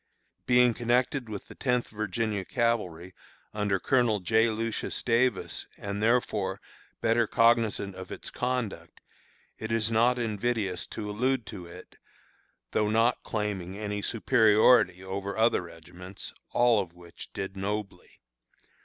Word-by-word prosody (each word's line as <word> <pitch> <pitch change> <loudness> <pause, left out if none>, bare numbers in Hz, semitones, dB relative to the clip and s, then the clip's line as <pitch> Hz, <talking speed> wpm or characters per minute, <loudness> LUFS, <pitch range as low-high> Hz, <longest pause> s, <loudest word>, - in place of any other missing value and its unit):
Being 125 -1 +5
connected 120 +2 0
with 105 -2 -6
the - - -12
Tenth 125 -2 0
Virginia 105 -1 -2
Cavalry, 95 -8 -1 0.4
under 105 -2 0
Colonel 120 -4 +2
J. 110 +5 +3
Lucius 115 +1 -3
Davis, 120 +1 0
and, 100 0 -4
therefore, 105 -4 +1 0.4
better 115 0 +2
cognizant 115 -4 +2
of 95 0 -9
its - - -6
conduct, 115 -10 -3 0.6
it 110 0 -5
is 115 0 +1
not 120 +3 +3
invidious 110 -5 -1
to 105 -2 -6
allude 125 +3 0
to 90 -2 -8
it, 90 +2 -13 0.7
though 105 -1 +1
not 115 +3 +2
claiming 100 -4 -3
any 105 -1 -3
superiority 105 -4 +4
over 100 +2 -4
other 115 -1 +3
regiments, 90 +2 -9 0.2
all 120 -2 +4
of 90 -3 -8
which 85 -1 -12
did 95 0 -5
nobly. 100 -1 -5
105 Hz, 125 wpm, -28 LUFS, 95-115 Hz, 0.7 s, Being